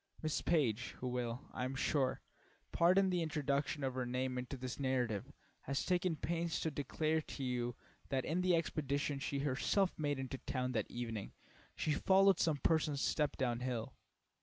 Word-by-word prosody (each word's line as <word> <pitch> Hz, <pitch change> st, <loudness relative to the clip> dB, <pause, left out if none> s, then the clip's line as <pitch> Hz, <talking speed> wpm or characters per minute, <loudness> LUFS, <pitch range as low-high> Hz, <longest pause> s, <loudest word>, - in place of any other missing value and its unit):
Miss 155 Hz, -1 st, 0 dB
Page, 130 Hz, -7 st, +1 dB
who 125 Hz, -, -4 dB
will, 125 Hz, 0 st, -2 dB
I -, -, -2 dB
am 130 Hz, +1 st, -2 dB
sure, 135 Hz, 0 st, +1 dB, 0.5 s
pardon 185 Hz, +3 st, +4 dB
the 180 Hz, -1 st, +1 dB
introduction 145 Hz, -2 st, 0 dB
of 130 Hz, -1 st, 0 dB
her 130 Hz, 0 st, -1 dB
name 125 Hz, +1 st, -1 dB
into 125 Hz, +2 st, -5 dB
this 130 Hz, +1 st, -5 dB
narrative, 130 Hz, -2 st, 0 dB, 0.3 s
has 140 Hz, 0 st, -1 dB
taken 180 Hz, -2 st, +2 dB
pains 170 Hz, +2 st, -1 dB
to 160 Hz, -, 0 dB
declare 155 Hz, +3 st, 0 dB
to 140 Hz, -, -6 dB
you 120 Hz, -2 st, -1 dB, 0.3 s
that 130 Hz, -2 st, 0 dB
in 170 Hz, +4 st, 0 dB
the 180 Hz, -1 st, +4 dB
expedition 145 Hz, -3 st, -1 dB
she 140 Hz, +1 st, -2 dB
herself 150 Hz, +8 st, +2 dB
made 145 Hz, -2 st, 0 dB
into 135 Hz, 0 st, -4 dB
town 130 Hz, 0 st, -2 dB
that 110 Hz, -4 st, -1 dB
evening, 115 Hz, -4 st, -4 dB, 0.4 s
she 155 Hz, -, 0 dB
followed 195 Hz, +3 st, +5 dB
some 160 Hz, -3 st, +2 dB
person's 150 Hz, -1 st, +2 dB
steps 150 Hz, -2 st, +1 dB
down 120 Hz, -3 st, 0 dB
hill. 125 Hz, -3 st, -3 dB
140 Hz, 170 wpm, -36 LUFS, 125-160 Hz, 0.5 s, followed